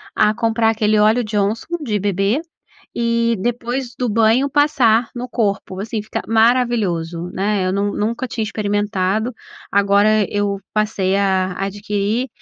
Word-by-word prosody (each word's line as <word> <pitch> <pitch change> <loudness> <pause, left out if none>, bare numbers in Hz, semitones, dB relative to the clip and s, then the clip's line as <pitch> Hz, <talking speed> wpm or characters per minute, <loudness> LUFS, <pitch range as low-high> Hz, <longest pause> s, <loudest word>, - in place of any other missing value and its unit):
A 210 -1 +4
comprar 225 -1 +1
aquele 215 -1 +1
óleo 220 +3 +4
Johnson 215 +10 -1
de 215 -6 -1
bebê 200 +5 0 0.6
e 235 0 +1
depois 240 +3 -3
do 245 0 -1
banho 230 +5 +3
passar 255 -6 +3
no 245 +1 -5
corpo. 200 -5 -2
Assim, 215 +2 -3
fica 215 - -4
maravilhoso, 220 -8 +1
né? 195 -1 0
Eu - - 0
nun 200 +1 0
nunca 230 +5 -2
tinha 225 -1 -3
experimentado, 205 0 -1 0.4
agora 200 +1 +3
eu 205 -1 -1
passei 210 -3 0
a 190 -2 +1
adquirir 205 +4 -2
215 Hz, 135 wpm, -19 LUFS, 200-235 Hz, 0.6 s, A